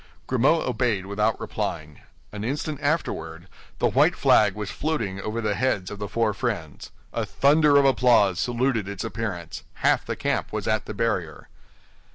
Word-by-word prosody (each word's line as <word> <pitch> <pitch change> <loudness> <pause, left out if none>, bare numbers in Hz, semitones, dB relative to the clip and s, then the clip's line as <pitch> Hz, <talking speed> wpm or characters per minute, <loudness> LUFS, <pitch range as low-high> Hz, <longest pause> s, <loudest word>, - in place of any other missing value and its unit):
Grimaud 135 +6 +2
obeyed 115 -6 0
without 105 +2 0
replying. 75 -2 -5 0.3
An 105 0 -6
instant 145 +4 -3
afterward, 85 - -2 0.3
the - - 0
white - - +3
flag 105 -3 +4
was 105 -1 -5
floating 115 -11 -2
over 110 +3 -3
the 105 -2 0
heads 100 -5 -1
of 105 - -7
the 105 - -4
four 115 -2 +1
friends. 100 - -4 0.2
A - - -1
thunder 145 +1 +4
of 140 - +5
applause 120 -8 +4
saluted 120 -1 0
its 100 -2 -5
appearance; 100 -9 -5 0.2
half - - +4
the - - -4
camp - - -2
was - - -4
at 110 0 0
the 105 - -7
barrier. 105 -8 -2
110 Hz, 165 wpm, -24 LUFS, 100-130 Hz, 0.3 s, of